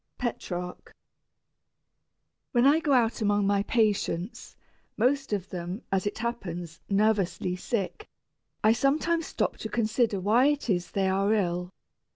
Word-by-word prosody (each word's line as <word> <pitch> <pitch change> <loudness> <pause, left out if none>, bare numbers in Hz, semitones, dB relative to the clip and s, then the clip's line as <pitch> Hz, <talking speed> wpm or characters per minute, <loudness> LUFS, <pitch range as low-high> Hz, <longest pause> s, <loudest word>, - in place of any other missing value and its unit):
PETRARCH. 180 -7 -5 1.6
When 240 0 +4
I 290 +3 +6
go 315 -3 -1
about 235 -4 +3
among 205 -1 +2
my 200 0 +2
patients, 210 -1 -1 0.4
most 270 +4 +1
of 200 -2 -2
them, 180 +4 -5
as 195 +1 +1
it 205 - -3
happens, 175 -8 -4
"nervously" 195 -3 +1
sick, 225 - -3 0.6
I 215 - +6
sometimes 315 +6 +1
stop - - -1
to - - -5
consider 225 -2 +1
why 225 +8 +4
it 290 -5 0
is 175 -2 -1
they 195 -1 0
are 195 +2 +2
ill. 180 -3 -1
210 Hz, 135 wpm, -28 LUFS, 185-240 Hz, 1.6 s, I